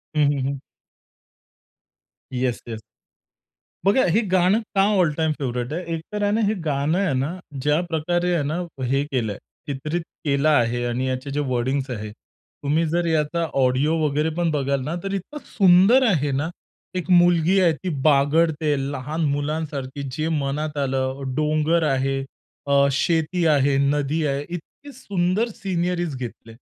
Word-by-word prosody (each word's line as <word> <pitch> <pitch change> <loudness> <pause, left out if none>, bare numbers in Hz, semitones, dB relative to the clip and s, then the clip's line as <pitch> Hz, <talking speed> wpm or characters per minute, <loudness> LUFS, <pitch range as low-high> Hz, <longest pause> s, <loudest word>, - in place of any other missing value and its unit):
हं, 150 - +3
हं, 135 -2 -1
हं. 140 -1 -4 1.7
Yes, 125 -1 -1
yes. 110 -1 -6 1.0
बघा, 205 +7 +4
हे 215 - +4
गाणं 185 +4 +4 0.2
का 195 - +5 0.2
ऑल 165 -4 +3
टाईम 160 -1 +1
फेव्हरेट 125 0 -3
आहे? 180 +2 -3
एक 160 - -3
तर 210 - -2
आहे 205 - +2
ना, 225 - +1
हे 215 - +2
गाणं 150 +3 0
आहे 185 -8 +1
ना 155 +8 -2 0.3
ज्या 150 +2 +3
प्रकारे 175 +2 0
आहे 155 -4 +1
ना 155 +4 -2 0.3
हे 135 +3 +1
केलंय, 120 -8 -2 0.3
चित्रित 150 +5 -3 0.2
केलं 140 +1 +2
आहे 120 -4 +2
आणि 125 +2 -1
याचे 130 +2 -3
जे 145 - -2
वर्डिंग्स 130 +3 -1
आहे, 105 -2 -5
तुम्ही 150 +8 -4
जर 170 +2 0
याचा 165 +1 0
ऑडिओ 130 +5 +2
वगैरे 150 +2 +1
पण 170 -2 +1
बघाल 140 -2 0
ना, 155 +5 -3
तर 195 0 -3
इतकं 200 +10 -5
सुंदर 195 +6 +5
आहे 145 -8 +1
ना. 145 +5 -1 0.5
एक 180 0 -3
मुलगी 175 +1 +5
आहे, 170 -3 +4
ती 185 - -5 0.2
बागडते 150 +1 +3 0.2
लहान 150 +4 -3
मुलांसारखी, 145 -2 -3
जे 155 +4 -2
मनात 150 +2 -3
आलं. 135 0 -1
डोंगर 155 +2 +1
आहे, 135 +1 0 0.5
अ, 140 0 +4
शेती 165 +4 +1
आहे, 140 -2 +3
नदी 145 +2 +1
आहे, 140 0 -1
इतकी 175 - -9
सुंदर 200 -1 0
सिनरीज 175 -4 -2
घेतले. 120 -2 -8
150 Hz, 155 wpm, -23 LUFS, 135-175 Hz, 1.7 s, का